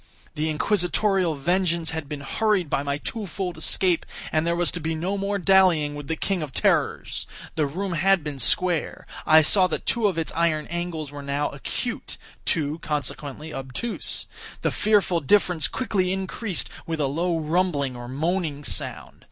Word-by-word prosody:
The 155 +1 -1
Inquisitorial 180 +1 +1
vengeance 170 +2 +1
had 160 -3 -5
been 150 -2 -5
hurried 190 +2 +1
by 140 - +2
my 140 0 -1
two 210 +7 -4
fold 180 0 -3
escape, 175 +2 +2 0.3
and 155 +1 +1
there 170 - +2
was 175 0 +1
to 175 - -4
be 160 0 -2
no 180 +5 -1
more 200 +1 -1
dallying 180 -6 +4
with 145 -1 -7
the 160 - -1
King 190 +2 -1
of 150 -3 -4
Terrors. - - +1 0.3
The 155 -2 +1
room 185 +6 -3
had 185 +1 +3
been 145 -3 -5
square. 175 +6 +1 0.2
I 155 0 +8
saw 185 +4 +4
that 170 - -3
two 230 -3 +3
of 185 -5 -1
its 165 - -1
iron 165 -2 +1
angles 170 -4 -3
were 145 0 -7
now 140 +1 -1
acute—two, 155 0 -3
consequently, 150 0 -4
obtuse. 135 - -2 0.4
The - - +2
fearful 205 -5 +3
difference 175 0 +3
quickly 195 -7 0
increased 190 +1 -2 0.2
with 165 -1 -2
a 145 - +2
low 165 +5 0
rumbling 155 -4 0
or 120 0 -7
moaning 155 +2 -1
sound. - - -3
165 Hz, 170 wpm, -25 LUFS, 150-185 Hz, 0.4 s, I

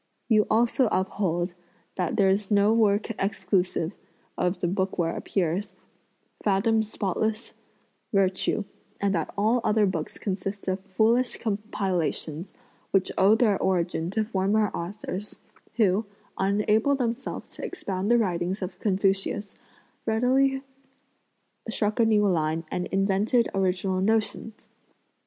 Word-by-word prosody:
You 215 -3 +4
also 235 +2 +3
uphold 180 -2 0 0.4
that 180 -3 -1
there's 195 0 +2
no 205 +1 +4
work 215 -1 +2
exclusive 185 -3 0 0.4
(of 180 +1 0
the 175 - 0
book 190 +1 -1
where 165 -1 0
appears) 185 +1 -2 0.7
"fathom 215 +2 +2
spotless 220 +1 -2 0.6
virtue;" 195 +1 +1 0.4
and 200 0 +1
that 165 -4 -1
all 220 +4 +2
other 210 0 +3
books 170 -5 -3
consist 195 0 -4
of 185 +1 0
foolish 225 +6 +1
compilations, 190 -6 -2 0.4
which 195 -1 +1
owe 200 +3 +5
their 220 -4 +2
origin 170 -2 0
to 215 +3 0
former 210 0 +1
authors, 195 +3 -6 0.4
who, 210 -1 +2 0.3
unable 210 +7 +2
themselves 250 0 -3
to - - -8
expound 195 - -3
the 240 - +5
writings 185 -2 -1
of 185 - -6
Confucius, 195 0 0 0.5
readily 265 +4 +2 1.1
struck 215 0 -1
a 230 - +5
new 210 -2 +4
line 160 -2 0
and 180 - -2
invented 200 +5 +2
original 185 0 0
notions.' 220 +1 -1
200 Hz, 120 wpm, -26 LUFS, 185-220 Hz, 1.1 s, owe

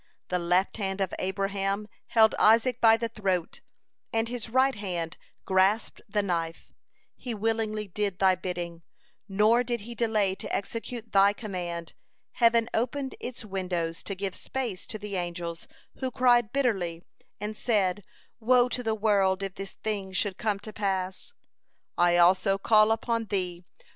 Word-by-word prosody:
The 180 - 0
left 180 +4 +1
hand 195 -2 -2
of 190 -2 -1
Abraham 195 +2 -1 0.2
held 220 -2 +5
Isaac 230 +3 +4
by 225 -1 +7
the 230 - -2
throat, 190 -6 -2 0.5
and 225 -1 0
his 240 -2 -4
right 260 +3 +3
hand 175 -6 -3 0.3
grasped 190 +4 +2
the 205 0 +1
knife. 165 -3 -3 0.4
He 245 -3 -5
willingly 215 -1 -1
did 200 0 -2
Thy 190 -1 +5
bidding, 175 -2 -5 0.5
nor 215 +5 +4
did 240 -2 -2
he 235 +3 -8
delay 220 -4 +1
to - - -7
execute 230 +2 -5
Thy 200 +1 +5
command. 175 -6 -5 0.4
Heaven 230 -1 +3
opened 260 +4 -1
its 245 -2 -6
windows 180 -4 -3
to 195 - -4
give 195 0 -3
space 240 -8 -4
to 215 - -5
the 205 -2 -5
angels, 170 -1 -4 0.3
who 260 - -1
cried 240 -3 +3
bitterly, 190 -11 0 0.4
and 210 +1 -4
said: 205 -4 +1 0.4
'Woe 245 +2 +4
to 250 - -2
the 225 -2 0
world, 200 -3 +2
if 195 -1 -3
this 195 0 -7
thing 200 -3 -3
should 190 0 0
come 210 -2 0
to 215 - -8
pass!' 190 - -2 0.6
I 175 0 +4
also 185 +3 +4
call 215 +2 +5
upon 230 0 0
Thee! 180 -4 -3
205 Hz, 155 wpm, -28 LUFS, 185-225 Hz, 0.6 s, by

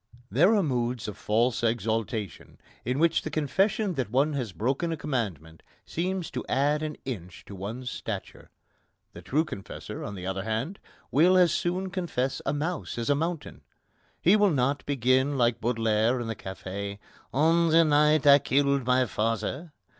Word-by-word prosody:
There 180 - +5
are 205 - +3
moods 125 -5 -1
of 105 - -5
false 115 +4 +1
exaltation 110 -2 -2 0.3
in 125 +3 -1
which 165 +2 +3
the - - -5
confession 195 +7 +1
that 130 -8 -2
one 140 +6 +2
has 125 -7 -3
broken 135 - -1
a 165 - -2
commandment 95 - -4 0.2
seems 180 +1 -3
to 125 - -4
add 145 +3 +2
an 155 -1 -4
inch 90 -9 -7
to - - -10
one's 110 +7 -5
stature. - - -6 0.6
The - - -10
true 155 +4 0
confessor, 130 -11 -7
on 100 - -5
the 90 -1 -7
other 95 0 -2
hand, 110 - -3 0.3
will 175 +6 +5
as 180 -3 +5
soon 185 +2 -1
confess 155 -8 -2
a - - +2
mouse 155 +1 -3
as 120 +4 0
a - - +4
mountain. 165 +1 -3 0.6
He 185 +5 +5
will 205 -1 +4
not 140 -2 0
begin, 130 +1 +2
like 120 -2 +2
Baudelaire 115 +1 +1
in 120 - -3
the 115 0 -3
café: 100 +1 -6 0.3
"On 165 +4 +3
the 165 +1 +6
night 150 -1 +3
I 140 0 +8
killed 140 -1 +1
my 125 0 +4
father...." 115 - -2
135 Hz, 170 wpm, -27 LUFS, 115-155 Hz, 0.6 s, I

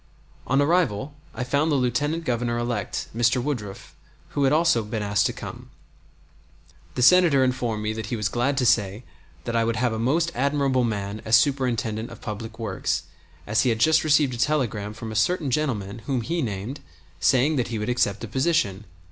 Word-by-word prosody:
On 135 +2 +2
arrival 145 - +1 0.2
I 125 - -2
found 145 +5 +1
the - - +3
Lieutenant 145 +5 0
Governor 120 -1 -1
elect, 120 -4 -3
Mr. 120 +2 +2
Woodruff, 120 -7 -5 0.3
who 140 - 0
had 135 - +3
also 155 -6 +3
been 105 0 -4
asked 100 -1 +2
to - - -2
come. - - -9 1.3
The 125 - +1
Senator 170 -4 +6
informed 120 -4 -1
me 110 0 -1
that 110 -1 -5
he 120 - -2
was 105 -3 -1
glad 125 +5 0
to 130 - +2
say 110 -2 +2 0.4
that 120 - -3
I 115 - +3
would 115 0 0
have 120 0 0
a 110 - -3
most 160 +8 +1
admirable 140 -1 +1
man 105 -2 -3
as 110 +2 +5
Superintendent 120 -4 0
of 115 - -11
Public 110 +1 -7
Works, 115 -1 -2 0.4
as 110 +1 +2
he 130 - +2
had 115 - +1
just 155 +8 +4
received 150 -4 +3
a - - -5
telegram 115 -7 -1
from 110 0 -7
a - - -6
certain 170 - +1
gentleman, 115 -8 -1
whom 130 -3 0
he 165 +7 -2
named, 110 +4 -4 0.4
saying 140 +4 +3
that 125 - 0
he 115 - -3
would 105 0 -3
accept 110 -4 0
the 115 - -5
position! 115 - 0
120 Hz, 190 wpm, -24 LUFS, 110-140 Hz, 1.3 s, Senator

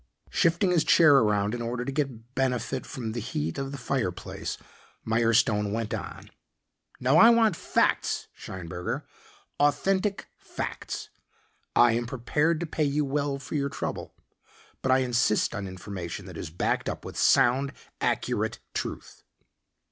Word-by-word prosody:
Shifting 170 +3 +2
his 170 -3 +3
chair 155 -5 +6
around 105 -3 +2
in 120 - -3
order 120 +1 -3
to 135 - -2
get 130 -4 -3
benefit 130 -1 -1
from 120 -5 -5
the 120 - -3
heat 80 - -3
of 135 0 -3
the 140 - -5
fireplace, 110 -9 -3 0.5
Mirestone 110 -2 +2
went 115 0 -2
on. - - -6 0.7
"Now 130 +5 +3
I 230 - +9
want 225 -5 +4
facts, - - +1
Scheinberger, 90 -1 -5 0.6
authentic 190 +8 +1
facts. - - -5 0.6
I 120 -1 +6
am 120 +1 -1
prepared 150 +6 0
to - - -1
pay 155 -1 -1
you 145 +1 +1
well 140 0 -1
for 135 - -9
your 140 -2 0
trouble, - - -5 0.7
but 130 - +1
I 130 0 +4
insist 120 -3 +2
on 100 -3 -4
information 95 -2 -6
that - - -10
is - - -5
backed 85 - -1
up - - -6
with - - -7
sound, 135 +3 +4 0.3
accurate - - 0 0.2
truth." - - -5
125 Hz, 145 wpm, -27 LUFS, 110-145 Hz, 0.7 s, I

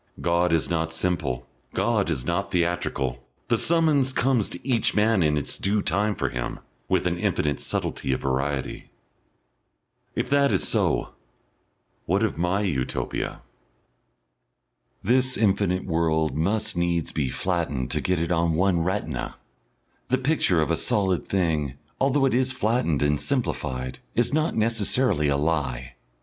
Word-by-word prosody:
God 85 +1 +2
is 80 -1 +2
not 80 -1 -1
simple, 80 -9 -1 0.3
God 110 -5 +1
is 65 -7 -1
not - - -1
theatrical, 75 -8 -1 0.3
the - - +4
summons 155 -6 +2
comes 125 -5 +2
to 90 - -9
each 120 -4 +2
man 105 -1 +3
in 75 -2 +2
its 75 - -1
due 100 +1 +1
time 105 +1 +1
for - - -1
him, - - -4 0.3
with - - +2
an - - 0
infinite 70 -3 0
subtlety - - -2
of 65 - 0
variety.... 70 0 -2 1.3
If - - -1
that 140 -1 +4
is - - +1
so, - - +1 1.0
what 95 +5 +2
of 110 - 0
my 90 +4 0
Utopia? 75 -11 -2 1.6
This 130 +4 +2
infinite 95 -3 +1
world 80 -2 +1
must 105 +6 0
needs 85 -1 0
be 70 -4 -1
flattened 80 -7 -2
to - - -1
get 90 -1 +1
it 85 +1 -1
on 85 -1 +2
one 90 +1 +2
retina. 80 -6 -2 0.7
The 130 - +2
picture 130 - +2
of 75 - -2
a - - +3
solid 95 -4 0
thing, 80 -8 0 0.2
although 135 +1 +3
it 135 - +2
is 130 +1 +1
flattened 110 - +1
and 75 0 +2
simplified, 65 - -2 0.2
is 120 +3 +2
not 155 +2 +1
necessarily 110 - +2
a 70 -1 +2
lie. 65 -6 -1
90 Hz, 145 wpm, -25 LUFS, 75-110 Hz, 1.6 s, the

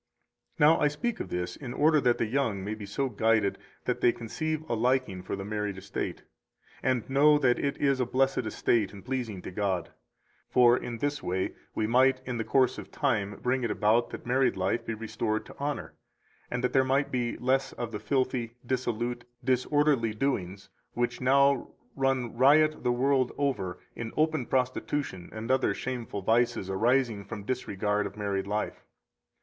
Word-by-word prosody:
217 150 - +6
Now, - - +1
I - - +6
speak 150 +12 -2
of - - -5
this 90 0 -3
in 125 -4 -7
order 155 0 +4
that 120 -2 +3
the - - +1
young 110 -5 -1
may 105 +2 -3
be 105 -2 -7
so 135 +7 -1
guided 110 -3 +1 0.3
that - - -1
they 120 - +5
conceive 155 +7 -4
a - - -1
liking 120 -4 +1
for 90 - -4
the 95 0 -6
married 105 -2 -3
estate, 95 - -5 0.6
and 125 -4 0
know 145 +3 +5
that 130 -4 +2
it 140 -1 -1
is 140 -2 +2
a 125 - +2
blessed 135 +2 +2
estate 105 -5 +1
and 100 - -11
pleasing 120 -7 -3
to - - -6
God. 95 -3 -1 0.6
For 120 -1 +6
in 120 -1 -4
this 145 +4 -2
way 95 +1 -2 0.2
we 110 - 0
might 130 +3 +4
in 125 -2 -3
the - - 0
course 130 +1 +2
of - - -9
time 105 -8 -1
bring 125 +1 +1
it 120 - 0
about 110 +3 +2
that - - -8
married 125 -2 +2
life 95 +5 0
be 115 - -4
restored 110 0 -2
to - - -12
honor, 145 +1 -3 0.6
and 125 0 -3
that 125 - 0
there 135 - +5
might 135 +2 +1
be 120 -2 -1
less 130 +2 +1
of 120 -2 -5
the 105 - -4
filthy, 130 -3 -1
dissolute, 120 -1 -2 0.2
disorderly 130 -2 +2
doings 100 -7 -2 0.2
which 120 0 -1
now 140 +2 +3 0.3
run 135 -4 0
riot 150 +5 +4
the 125 - +2
world 130 +1 +2
over 110 -11 -1 0.2
in 115 -1 -5
open 155 -5 +1
prostitution 130 -6 -1
and 110 +3 -4
other 130 0 +2
shameful 120 -6 -4
vices 115 -2 +1
arising 115 +1 +2
from 100 +1 -7
disregard 105 -3 -1
of - - -12
married 100 -2 -2
life. 105 +1 -3
120 Hz, 180 wpm, -28 LUFS, 105-135 Hz, 0.6 s, 217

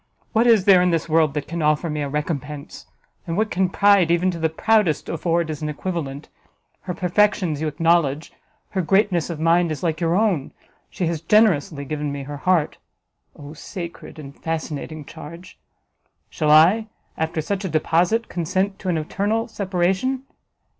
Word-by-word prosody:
What 230 +2 +3
is 220 -5 +5
there 190 -3 +7
in 180 - +3
this 165 -2 0
world 155 -2 +2
that 150 - -3
can 170 +1 -4
offer 155 +2 +1
me 150 -1 -3
a 140 - -2
recompense? 150 0 -5 0.4
And 165 +1 -2
what 215 0 0
can 185 0 +1
pride 200 -3 +4
even 175 +2 +2
to 170 - -6
the 160 0 +1
proudest 190 -2 +1
afford 165 0 -1
as 150 - -6
an 155 - -2
equivalent? 150 -3 -5 0.5
Her 180 -2 -5
perfections 180 -4 +1
you 160 - 0
acknowledge, 160 -1 +1 0.4
her 190 - -1
greatness 190 -1 +1
of 165 -3 -5
mind 165 +1 +3
is 155 - -5
like 160 -1 -1
your 170 0 +1
own; 190 -9 0 0.4
she 180 - -3
has 165 -2 -2
generously 165 -7 +2
given 150 0 -3
me 140 -1 -5
her 145 +1 -7
heart, 175 0 +1 0.6
Oh 145 +1 -10
sacred 170 +1 -8
and 140 -2 -10
fascinating 155 -1 -5
charge! 165 +4 -11 0.7
Shall 155 -2 -1
I, 175 +9 +5 0.3
after 160 0 -2
such 195 +6 -2
a 190 - -2
deposite, 170 +8 +1
consent 190 +3 -2
to 190 - -4
an 170 - +1
eternal 205 +8 -1
separation? 195 +6 -1
170 Hz, 170 wpm, -22 LUFS, 155-185 Hz, 0.7 s, there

